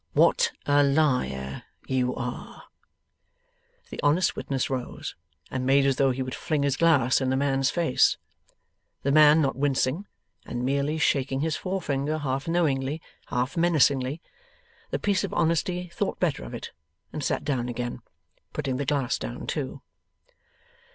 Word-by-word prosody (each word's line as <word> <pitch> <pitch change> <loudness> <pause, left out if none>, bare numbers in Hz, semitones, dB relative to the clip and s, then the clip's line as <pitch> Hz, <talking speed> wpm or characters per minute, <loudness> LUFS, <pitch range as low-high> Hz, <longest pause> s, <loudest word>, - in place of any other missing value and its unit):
'What - - +4
a 145 0 +4
liar 125 - +1 0.2
you 125 -1 0
are!' 125 0 -6 1.3
The - - -7
honest 155 +5 +2
witness 135 -2 -2
rose, 130 -2 -4 0.4
and 130 -1 -2
made 135 +1 +4
as 135 -1 +2
though 135 -1 +4
he 130 +1 -1
would 130 0 -5
fling 150 -3 -1
his 140 -2 +1
glass 140 -6 +3
in 130 - 0
the 130 - +1
man's 135 -1 +1
face. 165 -7 +3 0.9
The 140 - +1
man 155 +1 +7
not 135 - 0
wincing, 140 +6 0 0.4
and 120 0 -4
merely 140 +3 0
shaking 135 -3 +1
his 160 0 0
forefinger 155 -6 -2
half 135 -1 -2
knowingly, 150 -4 +1 0.3
half 125 +6 -1
menacingly, 150 -4 +2 0.7
the - - -1
piece 200 -1 +1
of 200 - -4
honesty 180 +2 0
thought - - -2
better - - 0
of 60 - -7
it - - -7 0.4
and 150 - -4
sat - - -1
down 125 -4 -1
again, 120 0 -4 0.5
putting 135 -4 -2
the 140 0 -3
glass 140 -3 0
down - - -6
too. - - -4
140 Hz, 150 wpm, -26 LUFS, 130-155 Hz, 1.3 s, man